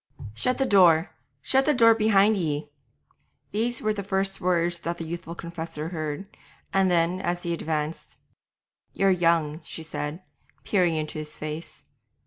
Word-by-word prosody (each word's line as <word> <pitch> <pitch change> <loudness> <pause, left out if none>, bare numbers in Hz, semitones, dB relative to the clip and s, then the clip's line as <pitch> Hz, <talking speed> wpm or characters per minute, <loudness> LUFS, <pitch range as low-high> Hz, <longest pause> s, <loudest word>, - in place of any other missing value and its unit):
'Shut 250 - +1
the 270 - +1
door! 175 -6 +5 0.3
shut 265 +1 +3
the 300 - +4
door 230 -2 +7
behind 215 -1 +4
ye!' 150 -5 -2 0.8
These 230 +3 -1
were 215 0 +2
the 205 - -4
first 195 0 -1
words 175 -1 +1
that 170 +1 -3
the 165 - -5
youthful 170 +1 -6
confessor 165 -2 -6
heard, 155 +2 -4 0.5
and 195 -1 +3
then, 175 +1 +1
as 175 -1 -2
he 170 - -1
advanced, 155 -1 -3 0.8
'You're 195 0 +3
young,' 165 -3 +2
she 165 - -6
said, 155 +2 -5 0.4
peering 180 -5 +2
into 155 0 -3
his 150 0 -7
face. 155 +2 -5
175 Hz, 150 wpm, -26 LUFS, 160-195 Hz, 0.8 s, door